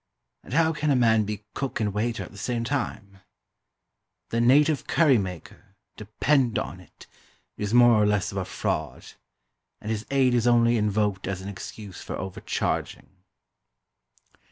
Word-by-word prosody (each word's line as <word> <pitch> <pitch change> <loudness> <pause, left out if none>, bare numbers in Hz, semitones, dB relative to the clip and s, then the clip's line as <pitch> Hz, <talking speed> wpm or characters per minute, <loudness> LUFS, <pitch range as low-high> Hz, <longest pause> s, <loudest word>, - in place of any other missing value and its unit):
And - - -10
how 160 0 +3
can 150 0 -1
a 140 - +4
man 110 -3 +3
be 105 0 -5
cook 135 -1 -3
and 105 -3 -1
waiter 115 +2 -2
at - - -11
the 100 - -14
same 120 +1 -2
time? 110 -7 -4 1.1
The 115 - 0
"native 145 +4 +3
curry 145 -8 +4
maker," 95 0 -8 0.2
depend 120 +4 +1
on - - -4
it, - - -17 0.5
is 105 0 -4
more 120 -2 +6
or 105 - +3
less 105 -2 0
of 95 - -3
a 95 - -3
fraud; - - -4 0.7
and 105 - -5
his 110 0 -4
aid 135 -2 +3
is 120 -1 +2
only 120 0 +4
invoked 105 -3 0
as 95 -1 -3
an 95 - -7
excuse 100 0 -9
for - - -6
overcharging. 95 0 -3
110 Hz, 155 wpm, -25 LUFS, 100-125 Hz, 1.1 s, more